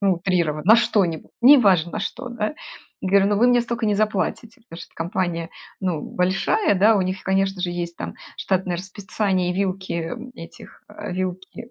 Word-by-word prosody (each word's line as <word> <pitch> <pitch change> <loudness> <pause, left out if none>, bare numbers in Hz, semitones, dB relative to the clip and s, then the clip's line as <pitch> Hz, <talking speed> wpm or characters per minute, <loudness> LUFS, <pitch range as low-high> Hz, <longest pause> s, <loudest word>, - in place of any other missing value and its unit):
ну, 195 -2 +3
утрированно, 170 -4 -1
на 220 +5 +7
что-нибудь, 205 -8 0
неважно 200 - +6
на - - -3
что, 245 +5 -5
да 235 +2 -3 0.5
-говорю. 195 +1 +4
"Ну, 205 0 +1
вы 240 +4 +4
мне 245 -1 +4
столько 235 -1 -3
не 210 - +2
заплатите"- 215 +2 -2
потому 165 - -9
что - - -15
компания, 170 -1 -3 0.3
ну, 180 -5 -1
большая, 195 - 0
да, 210 +3 +4
у 195 - +2
них, 185 +1 -3
конечно 195 0 0
же, 180 - -1
есть 170 -1 -5
там - - -5 0.2
штатное 185 -2 -1
расписание 190 0 -2
и - - 0
вилки 185 -3 -2 0.3
этих 165 - -13
э, - - -7
вилки 185 +6 -5
190 Hz, 175 wpm, -22 LUFS, 180-210 Hz, 0.5 s, на